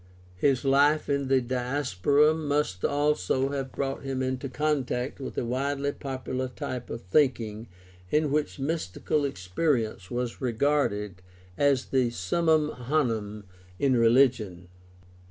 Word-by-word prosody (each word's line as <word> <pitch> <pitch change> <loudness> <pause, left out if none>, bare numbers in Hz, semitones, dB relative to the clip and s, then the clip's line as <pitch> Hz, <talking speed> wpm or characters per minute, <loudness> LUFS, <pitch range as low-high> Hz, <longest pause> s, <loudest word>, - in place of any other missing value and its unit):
His 135 +5 +2
life 145 +3 +3
in 140 -1 0
the 130 -1 +3
Diaspora 130 +2 +2
must 145 - -1
also 145 -3 +1
have 135 -2 -3
brought 135 -1 -3
him 135 -2 -2
into 130 +1 -2
contact 135 -3 -1
with 135 - -7
a - - 0
widely 140 +3 -1
popular 130 -2 -4
type 125 0 -6
of 115 - -6
thinking 115 0 +1 0.4
in 150 +3 +1
which 150 +1 0
mys 150 - -2
tical 140 +10 -1
experience 110 - -1
was 120 -1 -3
regarded 115 -7 0 0.3
as 140 0 +2
the 130 -3 +1
summum 155 - +1
honum 115 -6 -1 0.3
in 135 +2 +2
religion. 115 -7 +3
130 Hz, 125 wpm, -27 LUFS, 115-145 Hz, 0.4 s, life